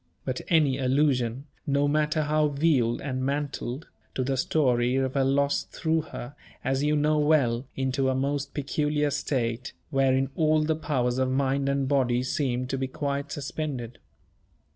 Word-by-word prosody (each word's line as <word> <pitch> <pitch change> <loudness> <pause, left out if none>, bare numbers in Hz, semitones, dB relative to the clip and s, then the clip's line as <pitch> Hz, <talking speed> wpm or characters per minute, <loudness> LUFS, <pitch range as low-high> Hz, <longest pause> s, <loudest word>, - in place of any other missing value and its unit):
But 130 -1 -2
any 150 -6 +3
allusion 130 -2 +1 0.2
no 140 0 +2
matter 150 +1 +1
how 150 0 +2
veiled 140 -5 +1
and 130 -2 -3
mantled 140 0 -3 0.3
to 130 - 0
the 135 +1 0
story 125 -3 +2
of 135 -1 0
her 135 - +2
loss 140 +1 +2
threw 160 -1 -1
her, 140 -3 -8 0.3
as 135 0 0
you 150 +1 +2
know 150 +1 +2
well, 140 -5 +2
into 130 0 0
a 130 - +1
most 140 +1 -2
peculiar 150 0 0
state, 130 -3 -2 0.2
wherein 135 -1 +2
all 155 -1 +3
the 160 +1 +1
powers 130 -5 -1
of 130 0 +1
mind 135 +1 +1
and 140 -1 0
body 125 -3 +2
seemed 130 -2 -1
to 135 - -1
be 130 - -1
quite 140 +1 -3
suspended. 135 -4 -4
140 Hz, 160 wpm, -27 LUFS, 130-150 Hz, 0.3 s, any